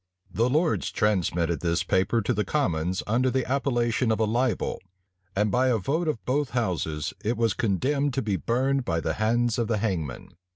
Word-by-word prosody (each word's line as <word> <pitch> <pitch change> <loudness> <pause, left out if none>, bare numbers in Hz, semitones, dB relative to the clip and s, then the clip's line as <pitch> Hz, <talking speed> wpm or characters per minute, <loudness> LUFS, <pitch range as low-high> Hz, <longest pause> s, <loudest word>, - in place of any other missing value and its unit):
The 115 +3 +2
lords 155 +5 +1
transmitted 85 -5 0
this 85 -1 0
paper 100 +5 +1
to 125 - +1
the 105 -1 0
commons, 90 - -1
under 125 +5 +2
the 130 0 0
appellation 120 -3 +1
of 110 - 0
a 110 - +3
libel; 120 0 0 0.5
and 105 +1 +1
by 125 +4 +3
a 125 -3 +3
vote 155 - -1
of 150 -8 -2
both 140 +1 0
houses 80 - -1
it 115 +2 0
was 115 -3 +2
condemned 130 +8 0
to 135 - 0
be 105 -3 0
burned 130 +6 0
by 85 -8 -1
the - - -1
hands 115 +2 +1
of 115 - 0
the 115 - +1
hangman. 90 - -3
115 Hz, 190 wpm, -26 LUFS, 95-130 Hz, 0.5 s, a